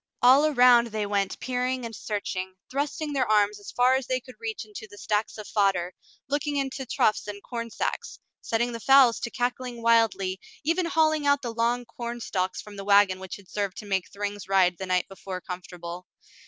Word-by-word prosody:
All 270 +5 +7
around 245 -4 +6
they 215 -2 -2
went 200 -1 -1
peering 255 0 -1
and 225 -1 -6
searching, 190 -3 -4 0.2
thrusting 290 +2 -2
their 260 -5 0
arms 210 -1 +3
as 205 - -10
far 250 +1 +3
as 265 -1 0
they 255 0 0
could 255 0 -14
reach 225 -1 -4
into 215 +1 -9
the 205 - -13
stacks 210 +2 -1
of 210 -2 -8
fodder, 190 -4 +1 0.3
looking 290 +1 -1
into 270 -1 -2
troughs 215 -1 +1
and 205 -1 -6
corn 230 -1 -5
sacks, - - -3 0.2
setting 235 +2 0
the 230 - -5
fowls 265 -1 +6
to 235 - -3
cackling 245 0 -3
wildly, 225 -5 +3 0.2
even 335 +3 +1
hauling 310 -3 +2
out 285 -1 +3
the 235 -2 -3
long 240 +2 0
corn 235 0 -6
stalks 185 -4 -2
from 210 -1 -11
the 195 - -5
wagon 200 -2 +4
which 190 -1 -7
had 200 -2 -15
served 200 -1 -3
to 215 - -7
make 190 -3 -1
Thryng's 205 -1 -5
ride 185 -2 +3
the 190 - -4
night 185 -1 +1
before 190 -1 -7
comfortable. 180 -1 -8
225 Hz, 195 wpm, -26 LUFS, 195-255 Hz, 0.3 s, All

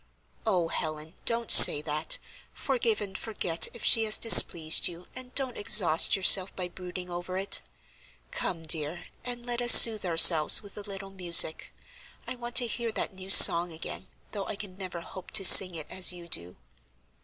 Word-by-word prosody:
"Oh, 180 -6 -5
Helen, 155 0 -11
don't 230 -1 -4
say - - +8
that. 155 +1 -8 0.4
Forgive 235 -5 -6
and 195 -2 -12
forget 185 -6 -4
if 235 - -16
she 225 - -1
has 215 - +2
displeased 165 -8 +4
you, 175 +1 -15
and 255 0 -15
don't 265 -3 -4
exhaust 185 -6 0
yourself 190 0 +1
by 180 -1 -10
brooding 180 0 -14
over 175 +1 -11
it. 195 +1 -1 0.7
Come, 185 - -9
dear, 160 +1 -5 0.2
and 245 -1 -10
let 245 0 -8
us 240 -1 +4
soothe 220 -2 +5
ourselves 165 +1 +2
with 200 - -19
a 210 - -12
little 195 -1 -14
music. 175 -4 -1 0.5
I - - -11
want 240 -1 -14
to 245 - 0
hear 235 0 -9
that - - -10
new 190 0 -16
song 175 -2 +5
again, 160 0 -13 0.2
though 200 -2 -11
I - - -9
can 200 -2 -13
never 185 -3 -12
hope 185 +2 -16
to 195 -3 0
sing 185 -1 +6
it 155 -2 -9
as 185 -1 0
you 175 -1 -15
do." 90 - -3
185 Hz, 180 wpm, -22 LUFS, 170-220 Hz, 0.7 s, say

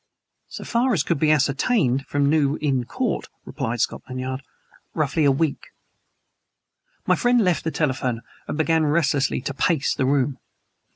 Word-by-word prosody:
So - - -8
far 245 +2 +1
as 160 -8 +1
could 170 -4 -1
be 155 - +2
ascertained 140 - +2
from 145 0 +1
New 145 -1 +2
Inn 135 -5 0
Court 240 - -2 0.2
(replied 120 -5 -3
Scotland 130 0 -3
Yard) 130 +1 -4 0.5
roughly 155 0 +1
a 140 - +5
week. 145 +2 -1 1.4
My - - +3
friend 245 0 +3
left 180 -3 +1
the 160 - -1
telephone 130 -6 -1 0.3
and - - -3
began 160 0 +2
restlessly 145 -4 +1
to 140 - -4
pace 150 +1 +1
the 130 - 0
room. 135 -1 +1
145 Hz, 155 wpm, -23 LUFS, 135-160 Hz, 1.4 s, a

